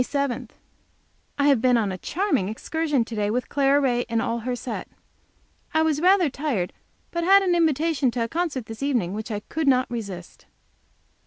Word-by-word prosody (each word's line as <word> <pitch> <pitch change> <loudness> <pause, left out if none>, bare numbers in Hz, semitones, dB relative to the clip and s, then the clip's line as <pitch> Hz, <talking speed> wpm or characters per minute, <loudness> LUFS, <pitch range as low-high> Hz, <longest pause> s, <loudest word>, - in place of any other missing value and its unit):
MAY - - +1
7. 270 -4 -2 0.9
I 285 0 +3
have 275 -6 +4
been 250 -2 +4
on 210 -4 0
a 185 - -4
charming 295 - 0
excursion 295 +2 -1
to 230 - -7
day 205 -1 0
with 245 +4 -2
Clara 280 0 +3
Ray 245 -3 +1
and 230 -1 +1
all 230 +1 -1
her 245 +2 -3
set. 240 -1 -5 0.9
I 315 - +4
was 310 -2 +1
rather 365 -1 +5
tired, 275 - -2 0.4
but 340 0 -2
had 390 +3 +6
an 365 -2 +2
invitation 320 -4 +2
to 235 -1 -1
a - - -2
concert 310 -4 -2
this 225 +2 -9
evening 240 -11 0
which 220 +2 -5
I 210 -2 -3
could 310 +6 -3
not 255 -1 +4
resist. 200 -7 -7
260 Hz, 190 wpm, -24 LUFS, 230-310 Hz, 0.9 s, had